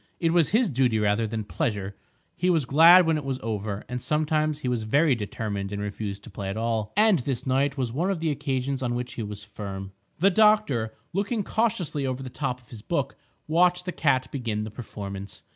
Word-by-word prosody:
It 165 -1 +2
was 170 -4 +4
his 225 +3 +3
duty, 125 -6 +2
rather 105 +1 +1
than 110 0 -3
pleasure; 105 -5 -2 0.4
he 180 - +1
was 165 -6 +2
glad 165 +7 +8
when 160 -1 +2
it 150 - -4
was 135 -1 -2
over, 105 -2 -3
and 125 0 -4
sometimes 155 0 +1
he 130 - -3
was 125 -2 0
very 140 +7 +3
determined 105 -3 -4
and 100 - -3
refused 100 -1 -4
to - - -11
play 100 -1 -5
at 100 - -4
all. 110 -2 -1
And 210 -5 +5
this 125 -1 -3
night 135 +2 +1
was 125 -4 -2
one 170 +8 0
of 195 -4 -1
the 160 -1 0
occasions 135 -2 -2
on 120 -2 -1
which 125 0 -4
he - - -5
was 105 -1 -6
firm. 100 -2 -7 0.3
The 195 +5 +4
doctor, 210 - +3 0.2
looking 205 +3 -1
cautiously 185 -11 0
over 130 +1 -3
the 130 - -7
top 125 -2 -3
of 120 - -25
his 115 -3 -9
book, - - -2 0.3
watched 180 +3 +3
the 180 - -2
cat 130 -6 +1
begin 115 -6 -2
the 110 - -6
performance. 100 -4 -7
130 Hz, 210 wpm, -26 LUFS, 110-160 Hz, 0.4 s, glad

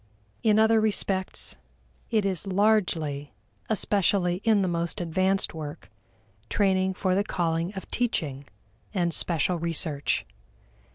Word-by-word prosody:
In 215 -2 +4
other 220 0 +5
respects, 195 -3 -1 0.5
it 215 -3 +2
is 195 0 0
largely, 180 -8 +1 0.4
especially 195 -3 +1
in 215 -3 +4
the - - +1
most 170 -1 -2
advanced 185 +3 +1
work, 150 -7 -7 0.6
training 190 -2 +2
for 185 -1 0
the 200 +2 +2
calling 170 -2 -1
of 190 - -6
teaching 150 - -1 0.5
and 175 -3 +1
special 170 +2 +1
research. 160 -3 -1
185 Hz, 115 wpm, -27 LUFS, 165-205 Hz, 0.6 s, other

